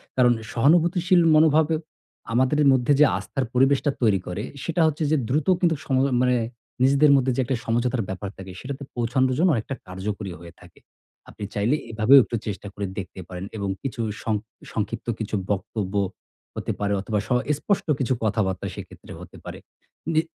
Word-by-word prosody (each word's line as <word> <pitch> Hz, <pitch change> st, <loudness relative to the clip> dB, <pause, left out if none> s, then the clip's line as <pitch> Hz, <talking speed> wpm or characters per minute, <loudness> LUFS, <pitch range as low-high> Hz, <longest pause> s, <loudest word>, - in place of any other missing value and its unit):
কারণ 125 Hz, -1 st, +5 dB, 0.2 s
সহানুভূতিশীল 175 Hz, -, +3 dB
মনোভাবে 155 Hz, 0 st, +4 dB, 0.6 s
আমাদেরে 130 Hz, +5 st, +3 dB
মধ্যে 130 Hz, +2 st, +3 dB
যে 150 Hz, -, +8 dB
আস্থার 135 Hz, -2 st, -3 dB
পরিবেশটা 135 Hz, +3 st, +3 dB
তৈরি 105 Hz, -5 st, +3 dB
করে 95 Hz, +4 st, -4 dB, 0.2 s
সেটা 170 Hz, 0 st, 0 dB
হচ্ছে 155 Hz, +1 st, -1 dB
যে 155 Hz, -, +4 dB
দ্রুত 145 Hz, +3 st, 0 dB
কিন্তু 170 Hz, -3 st, +3 dB
সম 135 Hz, -, 0 dB, 0.3 s
মানে 125 Hz, 0 st, +3 dB, 0.5 s
নিজেদের 140 Hz, +2 st, +5 dB
মধ্যে 130 Hz, -1 st, +2 dB
যে -, -, -3 dB
একটা 130 Hz, +1 st, -1 dB
সমঝোতার 120 Hz, +1 st, 0 dB
ব্যাপার 95 Hz, +1 st, -4 dB
থাকে, 95 Hz, -1 st, -9 dB
সেটাতে 140 Hz, +1 st, -6 dB
পৌছানোর 125 Hz, +2 st, +1 dB
জন্য 180 Hz, +3 st, +4 dB
অনেকটা 115 Hz, +5 st, -3 dB
কার্যকরী 95 Hz, +1 st, -5 dB
হয়ে 85 Hz, -1 st, -12 dB
থাকে। 90 Hz, -2 st, -17 dB, 0.5 s
আপনি 105 Hz, -, -10 dB
চাইলে 105 Hz, +7 st, +1 dB, 0.2 s
এভাবেও 115 Hz, +5 st, +7 dB
একটু 120 Hz, -, -4 dB
চেষ্টা 100 Hz, 0 st, -5 dB
করে 100 Hz, -, -4 dB
দেখতে 95 Hz, -, -8 dB
পারেন 90 Hz, 0 st, -6 dB
এবং 100 Hz, -2 st, -2 dB
কিছু 125 Hz, -4 st, -3 dB, 0.2 s
সং 110 Hz, -, 0 dB, 0.4 s
সংক্ষিপ্ত 110 Hz, +2 st, -4 dB
কিছু 110 Hz, -1 st, -3 dB, 0.2 s
বক্তব্য 100 Hz, 0 st, -3 dB, 0.6 s
হতে -, -, -3 dB
পারে 100 Hz, 0 st, 0 dB
অথবা 105 Hz, +1 st, -1 dB
স -, -, -17 dB, 0.3 s
স্পষ্ট 200 Hz, -1 st, -1 dB
কিছু 130 Hz, -1 st, +1 dB
কথাবার্তা 100 Hz, -4 st, 0 dB
সেক্ষেত্রে -, -, -11 dB
হতে -, -, -12 dB
পারে। -, -, -7 dB, 0.5 s
নি 155 Hz, -, +4 dB
125 Hz, 165 wpm, -24 LUFS, 105-140 Hz, 0.6 s, যে